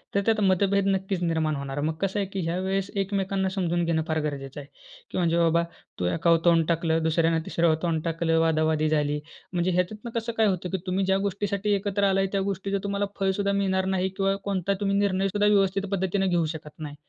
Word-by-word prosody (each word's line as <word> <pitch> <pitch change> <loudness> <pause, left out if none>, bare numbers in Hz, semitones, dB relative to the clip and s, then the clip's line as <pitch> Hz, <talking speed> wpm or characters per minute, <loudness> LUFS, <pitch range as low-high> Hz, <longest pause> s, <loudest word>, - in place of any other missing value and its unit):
तर 200 - +3
त्यात 225 -1 +2
मतभेद 195 +1 +2
नक्कीच 195 -1 0
निर्माण 160 -2 0
होणार, 140 0 -4
मग 155 +2 0
कसं 195 +1 0
आहे, 200 - -1
की 195 0 -5
ह्या 165 +1 -1
वेळेस 195 +1 -1
एकमेकांना 195 -1 0
समजून 175 -3 0
घेणं 165 -1 +1
फार 160 0 0
गरजेचं 140 -2 -5
आहे, 140 - -13 0.4
की - - -4
म्हणजे 170 -2 +2
बाबा, 170 0 +3 0.4
तू 90 - -1
एकावर 165 - +3
तोंड 165 -2 +5
टाकलं 165 -1 +1
दुसऱ्यानं 165 0 +2
तिसर 165 -1 +2
तोंड 165 -2 0
टाकलं 165 0 +1
वादावादी 155 -1 +2
झाली 150 -1 +1 0.3
म्हणजे 175 +1 +1
ह्याच्यातनं 205 +6 -2
कसं 230 +1 -4
काय 220 - +4
होतं, 185 -2 -1
की 190 - -1
तुम्ही 190 +1 0
ज्या 190 0 +2
गोष्टीसाठी 200 +1 -1
एकत्र 200 0 -1
आलाय, 195 0 +2
त्या 195 - 0
गोष्टीचं 195 0 -2
तुम्हाला 200 0 -1
फळसुद्धा 195 +1 +1
मिळणार 190 -1 +1
नाही 185 0 0
किंवा 195 0 +1
कोणता 200 -1 0
तुम्ही 200 0 +1
निर्णय 195 -1 +1
सुद्धा 205 +2 +1
व्यवस्थित 195 -1 +2
पद्धतीनं 190 0 0
घेऊ 175 -2 +2
शकत 150 -1 -10
नाही. 150 -2 -6
185 Hz, 205 wpm, -26 LUFS, 165-195 Hz, 0.4 s, तोंड